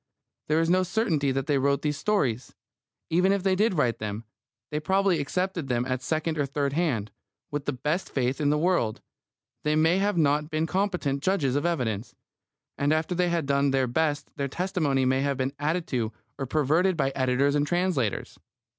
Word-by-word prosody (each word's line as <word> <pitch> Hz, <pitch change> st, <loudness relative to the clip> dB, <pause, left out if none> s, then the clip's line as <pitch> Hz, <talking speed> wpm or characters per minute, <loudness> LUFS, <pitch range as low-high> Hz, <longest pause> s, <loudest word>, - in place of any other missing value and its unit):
There 155 Hz, +1 st, +2 dB
is 165 Hz, -, +2 dB
no 185 Hz, +2 st, +4 dB
certainty 180 Hz, -, 0 dB
that 135 Hz, 0 st, -1 dB
they 145 Hz, -2 st, +1 dB
wrote 140 Hz, +1 st, +1 dB
these 150 Hz, -1 st, 0 dB
stories. 135 Hz, -, -1 dB, 0.6 s
Even 180 Hz, +4 st, +3 dB
if 200 Hz, -2 st, 0 dB
they 190 Hz, -1 st, +2 dB
did 210 Hz, 0 st, +2 dB
write 125 Hz, -7 st, +1 dB
them, 105 Hz, +1 st, -4 dB, 0.5 s
they 150 Hz, -, -1 dB
probably 190 Hz, +1 st, +2 dB
accepted 180 Hz, +1 st, -2 dB
them 125 Hz, -1 st, 0 dB
at 130 Hz, -1 st, -2 dB
second 155 Hz, +2 st, -1 dB
or 140 Hz, -, +1 dB
third 140 Hz, 0 st, -1 dB
hand. 130 Hz, -11 st, 0 dB, 0.4 s
With 145 Hz, -1 st, -3 dB
the 145 Hz, -, -1 dB
best 150 Hz, +8 st, -2 dB
faith 130 Hz, +1 st, -1 dB
in 145 Hz, -, +2 dB
the 150 Hz, -, +2 dB
world, 155 Hz, -10 st, +1 dB, 0.6 s
they 150 Hz, 0 st, +1 dB
may 160 Hz, +4 st, +3 dB
not 160 Hz, -8 st, +2 dB
have -, -, -16 dB
been 155 Hz, 0 st, 0 dB
competent 180 Hz, -7 st, -1 dB
judges 145 Hz, -7 st, +1 dB
of 145 Hz, +4 st, +1 dB
evidence. 120 Hz, -10 st, -2 dB, 0.6 s
And 145 Hz, +1 st, +2 dB
after 155 Hz, +3 st, +1 dB
they 180 Hz, 0 st, +1 dB
had 170 Hz, -3 st, 0 dB
done 140 Hz, 0 st, +2 dB
their 135 Hz, -1 st, +2 dB
best 145 Hz, +4 st, -1 dB
their 140 Hz, -1 st, -1 dB
testimony 155 Hz, -5 st, 0 dB
may 130 Hz, +1 st, +2 dB
have 140 Hz, -1 st, 0 dB
been 130 Hz, +1 st, -1 dB
added 160 Hz, +3 st, 0 dB
to 115 Hz, -4 st, -1 dB, 0.3 s
or 135 Hz, -, -3 dB
perverted 155 Hz, +6 st, +2 dB
by 135 Hz, -2 st, +1 dB
editors 130 Hz, +2 st, +1 dB
and 145 Hz, 0 st, +1 dB
translators. 175 Hz, -, -1 dB
150 Hz, 190 wpm, -26 LUFS, 135-175 Hz, 0.6 s, no